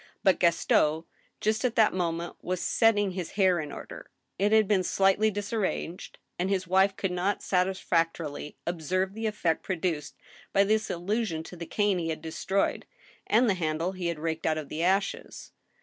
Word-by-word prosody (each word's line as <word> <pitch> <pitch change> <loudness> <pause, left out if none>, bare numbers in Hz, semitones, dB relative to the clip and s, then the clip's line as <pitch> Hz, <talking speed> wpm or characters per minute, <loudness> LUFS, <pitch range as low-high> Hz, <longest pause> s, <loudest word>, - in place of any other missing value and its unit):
But 190 -2 +4
Gaston, 160 -2 +3 0.4
just 220 +3 +1
at 250 -2 0
that 220 -2 +4
moment, 170 -1 -2
was 185 0 -2
setting 205 -3 +3
his 180 -2 -5
hair 190 -3 +3
in 150 -2 -5
order— - - -9 0.3
it 205 +2 +2
had 220 -2 +5
been 195 -3 +2
slightly 195 +4 +3
disar 205 +2 -3
ranged 180 -2 -4
— - - -50
and 180 +2 0
his 190 -2 0
wife 190 +2 +3
could 195 - -2
not 180 +3 -1
satisfactorily 165 -5 -1
obser\'e 185 +3 -1
the 220 +1 -2
effect 175 -6 0
pro 190 - -2
duced 165 -4 -3 0.4
by 195 - +5
this 215 +2 +1
allusion 180 -2 -2
to 180 - -10
the 170 -1 -7
cane 205 -3 +1
he 165 -1 -2
had 160 0 -4
destroyed, 190 +4 -1 0.4
and 235 +4 +4
the 205 - +4
handle 165 0 -1
he 185 -2 -4
had 170 -2 -2
raked 160 +1 -2
out 155 -1 +1
of 150 -3 -6
the 155 - -4
ashes. 190 +3 -1
185 Hz, 185 wpm, -28 LUFS, 165-200 Hz, 0.4 s, had